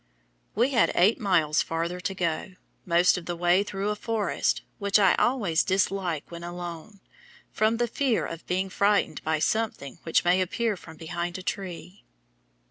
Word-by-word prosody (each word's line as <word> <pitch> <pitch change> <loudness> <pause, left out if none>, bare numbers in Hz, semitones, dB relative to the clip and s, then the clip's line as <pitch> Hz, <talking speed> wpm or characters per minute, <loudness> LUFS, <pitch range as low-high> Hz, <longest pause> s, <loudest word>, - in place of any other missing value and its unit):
We 240 +6 +2
had 235 -4 +3
eight 195 +8 +4
miles 170 -8 +2
farther 170 +2 -3
to 190 +2 -3
go 175 +2 -2 0.3
most 175 +1 +4
of 170 - -13
the 175 - -2
way 175 +2 +3
through 200 0 -3
a 210 - -1
forest, 215 -1 -1 0.2
which 200 0 +3
I 195 -3 +5
always 205 -11 +2
dislike 185 -4 0
when 170 0 -8
alone, 175 +3 -7 0.5
from 220 +1 +1
the 240 - +2
fear 250 0 0
of 165 0 -8
being 185 +2 -1
frightened 200 -5 +1
by 160 0 +1
something 155 - -2
which 165 - +1
may 180 +2 +4
appear 220 +4 -1
from 160 -3 -13
behind 170 +2 -4
a 185 - -8
tree. 185 +1 -6
185 Hz, 165 wpm, -26 LUFS, 170-205 Hz, 0.5 s, I